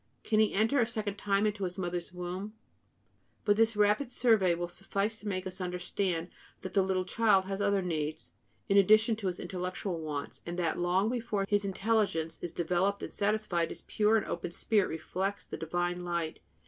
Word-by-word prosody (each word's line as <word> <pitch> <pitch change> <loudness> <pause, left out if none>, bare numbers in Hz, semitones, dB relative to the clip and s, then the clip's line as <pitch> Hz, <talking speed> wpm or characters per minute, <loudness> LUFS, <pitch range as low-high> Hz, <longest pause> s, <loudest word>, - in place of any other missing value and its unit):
Can 215 -1 +2
he 215 - +4
enter 225 +8 +2
a 235 - +3
second 215 -3 -3
time 200 0 +2
into 205 -1 -1
his 180 -1 -2
mother's 175 -2 -3
womb?" 180 +4 -5 0.9
But 205 -2 +4
this 225 +1 +3
rapid 210 +6 +3
survey 220 -8 +3
will 175 +1 -3
suffice 195 +4 -2
to 210 - -9
make 185 -2 -2
us 185 0 -6
understand 180 -1 -2 0.3
that 185 - -6
the 195 - +4
little 185 -1 0
child 200 -1 +3
has 195 +1 -3
other 200 -1 +2
needs, 155 -3 -3 0.4
in 200 - +3
addition 215 +3 +6
to 205 -3 -3
his 180 - -2
intellectual 180 0 -3
wants, 150 -3 -5
and 175 +1 -5
that 170 -2 0
long 180 +3 +2
before 230 -5 -1
his 205 0 +1
intelligence 195 -5 0
is 175 - -4
developed 180 +4 0
and - - -6
satisfied, 200 -5 0
his - - -8
pure 215 +1 +3
and 215 - -1
open - - -3
spirit 200 +3 +1
reflects 190 +5 -3
the - - -6
divine 175 +2 -2
light. 170 -2 -2
195 Hz, 185 wpm, -31 LUFS, 175-210 Hz, 0.9 s, addition